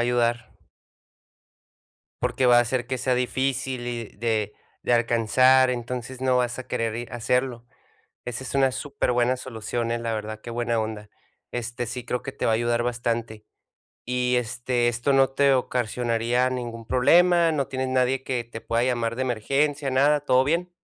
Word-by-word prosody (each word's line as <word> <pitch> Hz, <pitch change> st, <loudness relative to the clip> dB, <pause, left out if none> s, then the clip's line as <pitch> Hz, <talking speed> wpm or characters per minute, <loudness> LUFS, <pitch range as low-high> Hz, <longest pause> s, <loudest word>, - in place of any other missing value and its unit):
ayudar. 120 Hz, -1 st, +1 dB, 1.7 s
Porque 130 Hz, -, +1 dB
va 120 Hz, -1 st, +7 dB
a -, -, +7 dB
hacer 120 Hz, +1 st, -2 dB
que 130 Hz, 0 st, -3 dB
sea 130 Hz, 0 st, +1 dB
difícil 130 Hz, 0 st, -1 dB
y 120 Hz, -1 st, -3 dB
de 110 Hz, -2 st, -1 dB, 0.3 s
de -, -, 0 dB
alcanzar, 125 Hz, +3 st, +4 dB
entonces 125 Hz, +1 st, -5 dB
no 130 Hz, -1 st, +2 dB
vas 120 Hz, 0 st, -1 dB
a 130 Hz, -, -7 dB
querer 115 Hz, -1 st, -2 dB
ir 120 Hz, 0 st, -6 dB
a -, -, -4 dB
hacerlo. 125 Hz, 0 st, -1 dB, 0.6 s
Esa 125 Hz, +2 st, -5 dB
es 130 Hz, -, -6 dB
una 135 Hz, -1 st, +3 dB
superbuena 130 Hz, -2 st, 0 dB
solución, 115 Hz, -1 st, -4 dB
eh, 120 Hz, -, 0 dB
la 115 Hz, -1 st, -2 dB
verdad, 110 Hz, 0 st, -5 dB
qué 120 Hz, -, -10 dB
buena 120 Hz, -1 st, -1 dB
onda, 110 Hz, -1 st, -5 dB, 0.4 s
este, 120 Hz, 0 st, -4 dB
sí 125 Hz, 0 st, -6 dB
creo 125 Hz, +1 st, -2 dB
que 135 Hz, -, -6 dB
te -, -, -4 dB
va -, -, +3 dB
a -, -, +3 dB
ayudar 120 Hz, 0 st, 0 dB
bastante. 115 Hz, -2 st, -2 dB, 0.6 s
Y, 125 Hz, 0 st, 0 dB
este, 120 Hz, +1 st, -1 dB
¿esto 120 Hz, +4 st, 0 dB
no 135 Hz, -1 st, +4 dB
te 140 Hz, 0 st, +3 dB
ocasionaría 120 Hz, 0 st, 0 dB
ningún 120 Hz, -3 st, -5 dB
problema?, 170 Hz, +6 st, +4 dB
¿no 140 Hz, -3 st, -1 dB
tienes 130 Hz, -1 st, -3 dB
nadie 130 Hz, +1 st, +1 dB
que 125 Hz, -3 st, -2 dB
te 115 Hz, -1 st, -9 dB
pueda 115 Hz, +1 st, 0 dB
llamar 120 Hz, -2 st, 0 dB
de 130 Hz, -, -3 dB
emergencia, 135 Hz, +4 st, 0 dB
nada, 145 Hz, +2 st, +3 dB
todo 130 Hz, -2 st, +3 dB
bien? 170 Hz, +4 st, 0 dB
125 Hz, 175 wpm, -25 LUFS, 115-130 Hz, 1.7 s, va